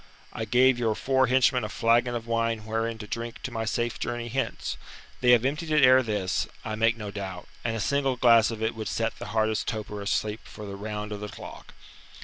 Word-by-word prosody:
I 110 - -3
gave 125 +3 +4
your 110 -3 +1
four 130 +2 +2
henchmen 130 -1 +3
a 105 - -3
flagon 120 +4 +2
of 115 -1 -4
wine 115 -2 -1
wherein 115 +1 -2
to 110 - -8
drink 115 +2 -6
to 130 - -4
my 115 -1 -3
safe 120 +1 -1
journey 120 0 -3
hence. 130 0 -2 0.4
They 125 - +2
have 120 0 +6
emptied 150 +4 -1
it 150 -2 +4
ere 130 +1 +7
this, 105 -6 -1 0.2
I 110 - -3
make 115 +2 +2
no 105 -2 -6
doubt, 95 -3 -6 0.2
and 115 -1 -1
a - - -3
single 135 +3 +1
glass 115 -2 +5
of 110 -1 -4
it 110 - 0
would 110 -1 -5
set 115 0 -2
the - - -6
hardest 110 -1 0
toper 105 -2 -4
asleep 105 +1 -1
for 105 - -10
the 100 -1 -6
round 105 +1 -5
of 105 - -4
the 105 0 -6
clock." - - -11
115 Hz, 220 wpm, -27 LUFS, 110-120 Hz, 0.4 s, ere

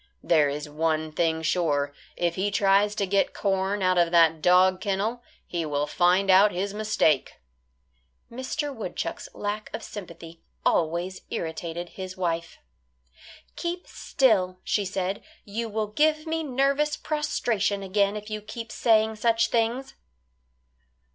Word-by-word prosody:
There 155 -4 +4
is 145 +1 -4
one 155 +1 -1
thing 160 0 0
sure; 145 -5 +1 0.2
if 175 -1 0
he 195 +3 -1
tries 200 +1 +3
to 200 - 0
get 195 +1 +1
corn 195 0 0
out 185 -1 +3
of 170 -1 +3
that 165 -2 +4
dog 185 +2 +4
kennel, 205 +5 -1 0.2
he 170 -1 -3
will 145 -1 -1
find 180 +5 +3
out 200 +3 +6
his 195 +3 -3
mistake." 210 -9 +1 1.0
Mr. 270 +4 -3
Woodchuck's 205 -6 -5
lack 210 +1 -4
of 225 - -7
sympathy 170 -4 -9 0.2
always 175 +3 0
irritated 170 +1 -4
his 185 0 -8
wife. 170 -2 -2 1.0
"Keep 345 +1 -4
still," 195 -9 +1
she 205 - 0
said, 190 +1 -2 0.2
"you 225 +3 -4
will 215 0 -1
give 310 +7 +2
me 325 0 -1
nervous 280 +1 +1
prostration 235 -10 -1
again 200 +1 +1
if 210 0 -7
you 215 0 -3
keep 225 +2 -8
saying 220 -1 +2
such 230 +1 +2
things." 235 +3 0
195 Hz, 135 wpm, -26 LUFS, 170-220 Hz, 1.0 s, out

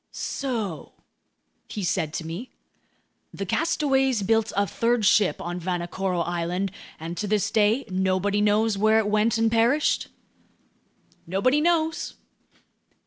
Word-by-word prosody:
"So," 225 - -4 0.7
he 205 - -5
said 170 -3 0
to 165 - -4
me, 175 +10 -6 0.8
"the 195 - -5
castaways 270 - +1
built 225 +2 +1
a 200 - +3
third 230 +2 0
ship 200 0 +3
on 175 +1 -4
Vanikoro 180 +1 -2
Island, 175 +3 -2 0.3
and 165 +2 -5
to 210 - -2
this 210 0 0
day, 220 +5 +2
nobody 190 +1 0
knows 210 0 +2
where 215 +1 +4
it 220 - +2
went 215 +2 +2
and 225 0 +2
perished?" 235 +6 +2 1.2
"Nobody 225 - +2
knows." 320 -1 0
210 Hz, 125 wpm, -25 LUFS, 185-230 Hz, 1.2 s, where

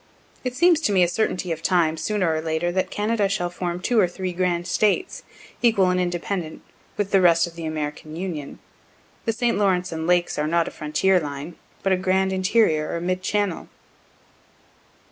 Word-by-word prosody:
(It 250 -1 -3
seems 345 +1 +4
to 215 - +1
me 185 -2 +4
a - - +3
certainty 180 -1 -1
of 165 0 -3
time, 165 -3 +2
sooner 185 -1 0
or 155 - -1
later, 160 +2 -1
that 185 +1 -1
Canada 210 -1 0
shall 175 -3 -1
form 175 0 -3
two 235 +5 +1
or 190 - +4
three 185 +1 -5
grand 175 -1 0
States, 215 - 0 0.4
equal 200 -6 +4
and 180 - +1
independent, 175 -1 -3 0.3
with 205 -1 -1
the 195 - +4
rest 170 -1 +5
of 170 - -9
the 165 -1 -7
American 155 0 -5
Union. 165 -5 -5 0.7
The 225 - +2
St. 235 -2 0
Lawrence 180 -3 +1
and 160 0 -4
lakes 175 -3 +1
are 150 - 0
not 170 +1 +2
for - - -6
a - - -20
frontier 180 +5 +2
line, 145 +1 -6 0.3
but 195 - +2
a - - +2
grand 190 +1 +1
interior 185 -5 +2
or - - -2
mid 185 +2 -2
channel.) 200 -2 -1
180 Hz, 190 wpm, -23 LUFS, 165-195 Hz, 0.7 s, rest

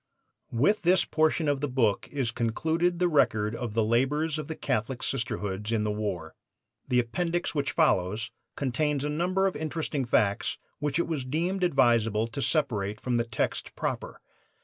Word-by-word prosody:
'" - - -57
With 150 - +2
this 180 +1 +4
portion 155 0 +1
of 145 -1 +1
the 145 - 0
book 120 -6 +1
is 135 -5 -1
concluded 160 +10 0
the 180 +1 +2
record 110 -9 +2
of 115 -3 -5
the 115 - +3
labors 145 +8 +1
of 150 - -5
the 160 - -4
Catholic 120 +1 -2
Sisterhoods 105 -4 -2
in 110 -2 +1
the 105 - 0
war. 100 -7 -3 0.5
The 125 - +1
appendix 170 +9 0
which 140 -2 -1
follows 110 - +1 0.2
contains 140 +1 0
a 150 - -1
number 180 +5 +1
of 190 - 0
interesting 155 -2 -2
facts 105 -3 +1 0.2
which 145 0 -1
it 170 - +1
was 155 -5 -2
deemed 170 +8 -1
advisable 115 - +3
to 130 +5 -4
separate 110 -10 0
from 125 -2 0
the 115 - +1
text 115 -2 -2
proper. - - -4
135 Hz, 170 wpm, -28 LUFS, 115-160 Hz, 0.5 s, this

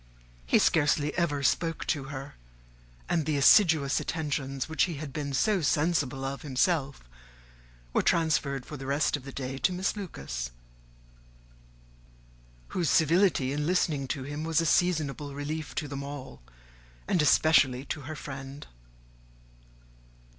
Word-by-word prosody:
He - - +4
scarcely 150 -1 +2
ever 145 -5 0
spoke 165 +2 0
to 145 -5 -1
her; 135 0 -7 0.7
and 165 - +1
the 155 -2 +1
assiduous 150 -1 +5
attentions 140 -4 -3
which 160 0 +2
he 175 -3 -5
had 145 -2 -7
been 145 -1 -3
so 195 - +2
sensible 145 -3 0
of 135 +1 -4
himself 140 - 0 0.9
were - - +3
transferred 150 -5 +1
for 150 - -8
the 135 0 -8
rest 140 +2 +1
of 140 -3 -8
the 140 - -7
day 135 0 -5
to 185 - +2
Miss 185 +3 -1
Lucas, 70 - -5 2.2
whose 170 -5 -1
civility 165 -4 +3
in 150 +1 -2
listening 155 -6 +1
to 135 +1 -3
him 145 +3 -5
was 160 -1 +1
a 165 - +1
seasonable 150 -5 0
relief 150 +2 -5
to 150 - -2
them 140 0 -5
all, 140 - -8 0.7
and 180 - +2
especially 145 -4 +4
to 150 - -4
her 150 +3 -7
friend. 135 0 -8
145 Hz, 140 wpm, -28 LUFS, 135-160 Hz, 2.2 s, assiduous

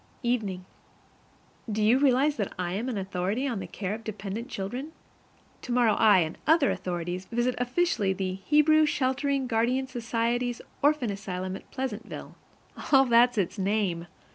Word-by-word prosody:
Evening. 210 -7 -1 1.1
Do 210 0 0
you 235 +5 +5
realize 280 +2 +3
that 205 - -2
I 180 -1 -2
am 225 +7 -2
an 235 - -3
authority 195 +6 -2
on 235 -6 -2
the - - -6
care 195 -1 -4
of 225 +1 -7
dependent 215 +3 -5
children? 250 +11 -5 0.7
Tomorrow 240 -3 +2
I 210 -4 +5
and 160 0 -3
other 315 -3 +4
authorities 175 +1 -4
visit 240 +3 0
officially 245 - +1
the 190 -1 -2
Hebrew 300 +9 +4
Sheltering 275 0 0
Guardian 245 +2 +1
Society's 240 0 -1 0.2
Orphan 285 -6 +2
Asylum 185 -2 -4
at - - -11
Pleasantville. 255 -4 -5 0.6
(All 270 -1 +7
that's 240 0 +4
its 200 +1 -1
name!) 190 -4 0
230 Hz, 145 wpm, -27 LUFS, 195-260 Hz, 1.1 s, All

